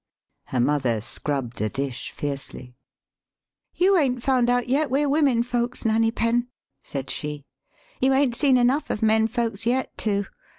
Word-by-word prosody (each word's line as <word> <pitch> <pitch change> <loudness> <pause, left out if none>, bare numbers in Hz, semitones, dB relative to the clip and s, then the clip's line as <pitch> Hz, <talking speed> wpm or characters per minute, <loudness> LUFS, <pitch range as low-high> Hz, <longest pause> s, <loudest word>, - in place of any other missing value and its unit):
Her 130 - -2
mother 130 -3 +1
scrubbed 120 +1 -3
a 110 - 0
dish 135 -1 -4
fiercely. 135 -3 -6 0.5
" - - -65 0.2
You 385 +2 +4
'ain't 255 -6 +1
found 255 -3 +2
out 245 0 +1
yet 280 +3 +1
we're 280 +3 +1
women 275 -5 +3
folks, 245 0 -2
Nanny 225 0 +3
THE 225 - -8
SPEAKING 230 0 +1
VOICE 240 +1 +3
Penn," 240 - -19 0.4
said 135 -1 -5
she. 150 -1 -5 0.6
"You 265 +1 +3
'ain't 265 -2 +3
seen 270 -1 +4
enough 250 +5 +2
of 210 - -2
men 220 0 +4
folks 230 -2 -2
yet 255 +2 0
to. 200 -2 0
230 Hz, 175 wpm, -24 LUFS, -, 0.6 s, You